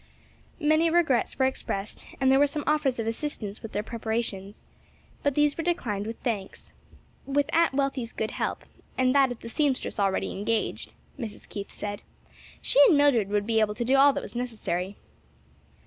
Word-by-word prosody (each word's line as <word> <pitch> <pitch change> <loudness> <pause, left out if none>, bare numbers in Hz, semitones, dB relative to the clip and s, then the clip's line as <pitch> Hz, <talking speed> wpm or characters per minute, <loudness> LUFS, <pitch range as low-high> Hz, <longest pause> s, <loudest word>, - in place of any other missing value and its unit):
Many 310 +1 +3
regrets 320 -8 +2
were 260 - +3
expressed 210 -5 -3
and 265 -1 +4
there 270 - +5
were 290 - +5
some 295 +1 -4
offers 300 -4 +1
of 225 - -2
assistance 225 -4 -4
with 225 - -8
their 205 - -2
preparations; 220 -3 -4 0.6
but 285 -2 0
these 295 -1 +3
were 330 - -3
declined 220 - -1
with 230 - -5
thanks: 210 -6 -4 0.6
"with 280 +1 +1
Aunt 330 -4 +3
Wealthy's 270 -4 -1
good 220 - -3
help, - - -3 0.3
and 255 0 +3
that 275 -2 +4
of 245 - -7
the - - -8
seamstress 265 -1 0
already 195 -1 +1
engaged," 215 +3 -2 0.3
Mrs. 225 -5 -7
Keith 200 -1 -7
said 205 -1 -5 0.6
"she - - +4
and 320 - +5
Mildred 260 -9 +4
would 205 0 0
be 225 0 +2
able 210 -1 +1
to 240 - -2
do 260 +3 +3
all 280 +1 +7
that - - -3
was 215 - -9
necessary." 210 -6 -3
245 Hz, 180 wpm, -27 LUFS, 210-285 Hz, 0.6 s, all